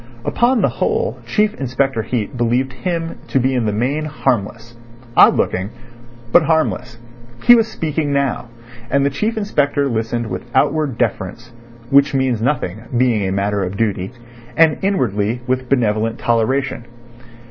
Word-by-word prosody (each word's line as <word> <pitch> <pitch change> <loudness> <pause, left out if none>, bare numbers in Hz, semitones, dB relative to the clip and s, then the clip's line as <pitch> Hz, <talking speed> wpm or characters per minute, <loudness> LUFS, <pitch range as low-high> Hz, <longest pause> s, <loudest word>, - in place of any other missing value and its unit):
Upon 240 -1 +2
the - - +5
whole 460 +2 -1
Chief 210 0 +1
Inspector 130 -1 0
Heat 120 +2 -3
believed 125 +2 0
him 165 +4 -4
to 135 - +1
be 130 +1 +1
in 120 -4 0
the - - +1
main 130 +9 -1
harmless—odd 120 -3 0
looking, 95 +2 -1 0.6
but 175 - +7
harmless. 155 - 0 0.5
He 240 - +8
was 225 -2 +4
speaking 155 -8 -2
now, 140 -3 -1 0.4
and 140 +1 +2
the 140 - +1
Chief 220 - -2
Inspector 145 -9 0
listened 115 -1 -2
with 120 +2 -6
outward 140 -1 +1
deference 115 0 -3 0.4
(which 140 +1 +4
means 130 -4 0
nothing, 115 -6 -1 0.2
being 115 -6 +2
a - - -2
matter 100 +1 0
of 95 +2 -4
duty) 100 -3 -1 0.5
and 160 -2 +4
inwardly 120 - 0
with 130 0 -2
benevolent 115 -3 +1
toleration. 120 +2 0
130 Hz, 145 wpm, -18 LUFS, 115-145 Hz, 0.6 s, He